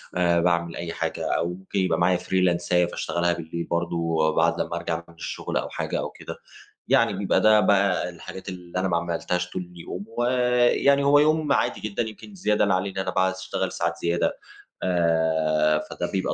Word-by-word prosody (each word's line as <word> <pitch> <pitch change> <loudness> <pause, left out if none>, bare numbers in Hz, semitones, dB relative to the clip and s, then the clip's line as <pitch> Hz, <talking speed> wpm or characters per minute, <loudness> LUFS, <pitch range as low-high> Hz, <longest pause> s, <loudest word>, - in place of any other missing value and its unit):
آآ، 85 -1 +3
باعمل 85 -1 +1
أي 85 -1 -5
حاجة - - -2
أو 85 - 0
ممكن 95 +2 -4
يبقى 95 -2 +1
معايا 90 +1 +3
فريلانساية 90 -1 +1
فاشتغلها 85 0 -1
بالليل 85 0 -5
برضه 85 0 -2
وبعد 80 0 +1
لما 85 - -3
أرجع 85 0 -3
من - - -15
الشغل - - -4
أو - - -2
حاجة - - -3
أو - - -3
كده. - - -9 0.5
يعني - - +3
بيبقى - - +1
ده 110 0 +6
بقى 100 -2 +2
الحاجات 90 +2 -9
اللي 90 -1 -6
أنا 95 - 0
ما 85 -2 +1
عملتهاش 90 +1 -2
طول 95 - -4
اليوم. 90 +3 -8
ويعني 125 +3 +3
هو 145 +1 +5
يوم 155 -1 +2
عادي - - +1
جدًا، 110 +2 -2
يمكن 110 - -9
الزيادة 105 - +1
اللي 100 -2 +2
عليه، 95 +1 -1
إن - - -12
أنا 95 - -1
باقعد 95 -1 +1
أشتغل 95 0 -3
ساعات 85 0 -2
زيادة، 85 0 0 0.4
آآ، 80 -3 +2
فده - - -4
بيبقى 95 -1 -1
90 Hz, 185 wpm, -25 LUFS, 85-100 Hz, 0.5 s, ده